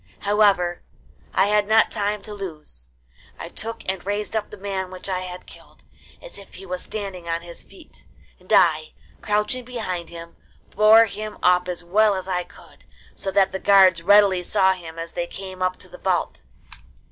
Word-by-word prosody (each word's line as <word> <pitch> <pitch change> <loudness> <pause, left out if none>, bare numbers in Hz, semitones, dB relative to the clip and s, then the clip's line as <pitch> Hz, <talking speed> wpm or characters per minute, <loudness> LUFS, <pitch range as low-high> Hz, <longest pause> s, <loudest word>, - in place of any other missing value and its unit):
However, 200 -4 +2 0.5
I 190 - +3
had 210 0 +2
not 220 +1 +4
time 205 0 -2
to 210 - -8
lose. 155 - -9 0.5
I - - -7
took 225 +1 -6
and 190 -1 -3
raised 205 +2 -3
up 220 - -2
the 210 - -11
man 190 -1 -4
which 185 +1 -8
I 185 -1 -1
had 180 0 -8
killed, - - -17 0.4
as - - -12
if 200 - -14
he 195 - -10
was 180 -1 -5
standing 195 -5 -6
on 165 0 -2
his 170 0 -10
feet, 345 -4 -16 0.3
and - - -15
I, 470 - +3 0.3
crouching 210 +4 -1
behind 215 -9 -5
him, 170 0 -11 0.3
bore 215 +2 +6
him 215 0 -7
up 180 0 +4
as 175 -1 -5
well 205 +4 +3
as 185 0 -5
I 180 -2 -2
could, - - -18 0.3
so 195 - -5
that 195 0 +3
the 190 - -4
guards 190 -4 +5
readily 200 0 +5
saw 190 +1 +2
him 165 -3 -10
as 165 0 -6
they 175 - -3
came 190 0 -9
up 185 0 0
to - - -14
the - - -13
vault. - - -2
190 Hz, 185 wpm, -23 LUFS, 180-210 Hz, 0.5 s, bore